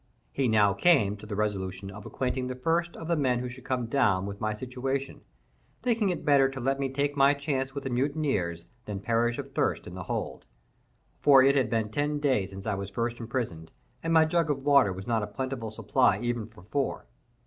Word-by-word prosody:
He 135 -2 0
now 105 -3 +4
came 105 - +3
to 105 - -11
the 105 - -4
resolution 95 -2 -2
of 105 +1 -9
acquainting 130 0 -2
the 130 - -4
first 165 +6 0
of 165 - -7
the 170 - +2
men 130 -5 +1
who 125 +1 -3
should 125 0 -11
come 130 -3 -1
down 115 -7 +2
with 100 0 -7
my 110 - 0
situation, 130 +3 -4 0.6
thinking 230 -4 +2
it 180 - -3
better 140 -3 +5
to 135 0 -7
let 135 +2 0
me 135 -1 0
take 140 +2 -1
my 140 +1 +5
chance 135 -2 -2
with 140 - -4
the 135 - -3
mutineers 120 - -1 0.2
than 100 -2 -4
perish 115 +3 +1
of 140 -1 -7
thirst - - 0
in - - -9
the - - -6
hold,—for 130 - 0
it 140 +1 +5
had 130 -5 +2
been 110 -2 -1
ten 145 +5 0
days 130 -10 +1
since 95 0 -9
I 110 - 0
was 100 0 -4
first 120 +3 -2
imprisoned, 115 -9 -4 0.3
and 165 - -2
my 160 -1 +6
jug 165 0 +1
of 135 -2 -1
water 140 -8 +5
was 95 +1 -7
not 115 -2 +1
a 105 - -3
plentiful 120 +2 -4
supply 115 -1 +2
even 120 -2 -2
for 110 -5 -17
four. 135 - -2
125 Hz, 215 wpm, -28 LUFS, 105-140 Hz, 0.6 s, my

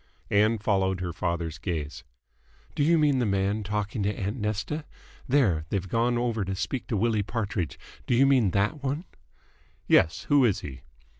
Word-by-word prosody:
Ann 105 +3 +4
followed 95 -3 0
her 90 -2 -3
father's 85 -1 -3
gaze. 80 -4 -4 0.7
"Do - - -2
you 165 +3 +4
mean 145 -4 +3
the 120 - +1
man 100 +2 0
talking 105 +2 -2
to 100 - +1
aunt 100 +5 -2
Nesta? 105 +8 -2 0.4
There, 110 - +2
they've 95 -2 -2
gone 120 +4 +1
over 120 -3 0
to 95 0 -3
speak 95 +7 -3
to 110 - -1
Willie 110 0 +1
Partridge. 100 - -3 0.3
Do 120 - +2
you 135 +3 +5
mean 130 -7 +4
that 105 - 0
one?" 140 +6 -2 0.8
"Yes. 80 - +3
Who 145 -2 +4
is 110 -6 +2
he?" 65 -3 -8
105 Hz, 170 wpm, -27 LUFS, 95-120 Hz, 0.8 s, you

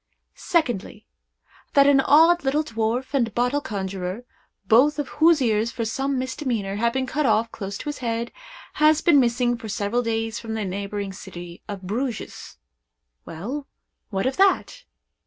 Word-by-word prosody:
Secondly. 240 - -1 0.7
That 280 -1 +6
an 280 -1 +5
odd 330 +5 +5
little 285 +3 +1
dwarf 230 +2 -2
and 240 -5 +1
bottle 250 +4 +1
conjurer, 195 -2 -4 0.4
both 265 +9 +4
of 290 -2 -3
whose 320 -3 +6
ears, 220 0 +1
for 230 -2 -3
some 270 +4 -1
misdemeanor, 250 -6 -2
have 235 +2 +2
been 265 0 0
cut 285 +2 0
off 225 +1 +2
close 200 -1 -6
to - - -9
his 295 -1 -4
head, 235 -1 -2 0.5
has 310 0 +5
been 310 -4 +5
missing 240 -1 +1
for 225 -3 -7
several 210 +3 -1
days 225 -1 -2
from 225 -1 -5
the 215 -2 -2
neighboring 200 +1 -4
city 175 -3 -10
of 200 -2 -6
Bruges. 230 +5 -4 0.7
Well—what 200 - -7
of 260 +1 -1
that? 395 +5 +2
235 Hz, 155 wpm, -24 LUFS, 210-275 Hz, 0.7 s, That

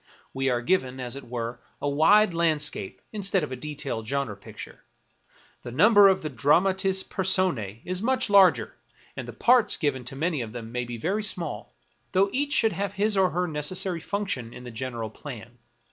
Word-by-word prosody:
We 135 0 0
are 120 -1 0
given, 130 -4 0
as 125 0 -4
it 140 - -8
were, 120 0 -4 0.2
a - - -2
wide 175 +8 +4
landscape 155 - -1
instead 195 -4 0
of 150 - -5
a - - -3
detailed 140 -5 -5
genre 140 -4 -2
picture. 100 - -11 0.8
The - - -8
number 205 - +6
of 190 -3 +2
the 155 - -2
dramatis 190 - +2
persona 185 - 0
is 185 +1 -2
much 255 +2 +1
larger, 185 - +5 0.4
and 130 -3 -6
the - - -6
parts 235 - +3
given 145 -6 -1
to 130 - -7
many 155 0 -1
of 110 -2 -6
them 115 -2 -7
may 125 0 -2
be 120 0 -6
very 190 - -1
small, 175 - -3 0.4
though 195 +2 +3
each 285 +2 0
should 225 -7 +3
have 200 0 -3
his 205 +1 +1
or 190 -1 +3
her 180 +1 -1
necessary 170 +3 -1
func 200 +3 -3
tion 120 -7 -3
in 125 - -10
the 125 - -8
general 115 -1 -5
plan. 120 -2 -10
150 Hz, 190 wpm, -26 LUFS, 125-190 Hz, 0.8 s, number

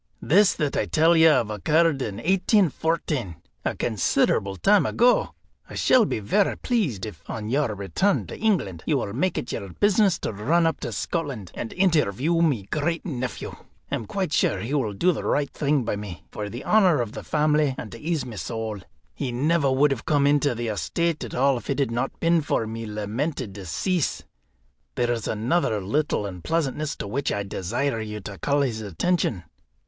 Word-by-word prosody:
This 195 +5 +4
that 150 -4 -1
I 105 - 0
tell 160 - +4
you 160 0 +7
of 120 -8 +2
occurred 150 - +2
in 105 -6 -3
1814, 160 - +1 0.3
a - - -1
considerable 100 -2 +1
time 200 - +4
ago. 245 +1 +2 0.3
I - - -9
shall 250 -4 +4
be - - -2
varra 150 - +1
pleased 165 - -1
if, 105 -7 -9
on 110 -1 -4
your 135 -4 0
return 100 - 0
to - - -9
England, 170 - 0
you 150 - +2
will 100 -6 -3
make 165 +9 0
it - - -3
your 100 - -5
business 205 -3 +3
to - - -3
run 155 +12 +2
up 165 - 0
to 120 - -4
Scotland, 135 - -3
and 115 - -5
interview 165 - +2
my 140 -11 +2
great 160 +2 -1
nephew. 130 -6 -4 0.4
I - - -3
am 110 - -5
quite 185 -6 -2
sure - - +2
he 120 +6 -4
will 125 -8 0
do 175 - +2
the 160 - -4
right 145 -1 0
thing 145 -2 +1
by 110 - -1
me, 90 -6 -8
for 105 -1 -5
the 120 +5 -7
honour 190 -8 +4
of 115 -3 -2
the - - -7
family, 150 -2 +2
and 110 - -7
to 115 - -9
ease 160 -2 -2
my 115 -4 -8
soul. 110 0 -4 0.3
He 125 - -3
never 140 +3 +2
would 140 +2 +3
have 130 -4 -3
come 145 -2 +2
into 145 -2 +3
the 115 0 -3
estate 150 - -1
at - - -6
all 135 0 +3
if - - -14
it 140 - 0
had 140 -5 0
not 125 +3 -2
been 165 0 +3
for 140 -5 0
my 115 +1 -5
lamented 105 +3 -3
decease. 130 - -2 0.7
There's 120 -2 0
another 110 +1 0
little 105 +3 0
unpleasantness 145 - -2
to - - -6
which 135 +7 -1
I 100 - -1
desire 115 +6 -2
you 105 -1 -5
to 100 -1 -8
call 140 - +1
his 115 -5 -1
attention. 105 - -1
135 Hz, 190 wpm, -24 LUFS, 105-165 Hz, 0.7 s, you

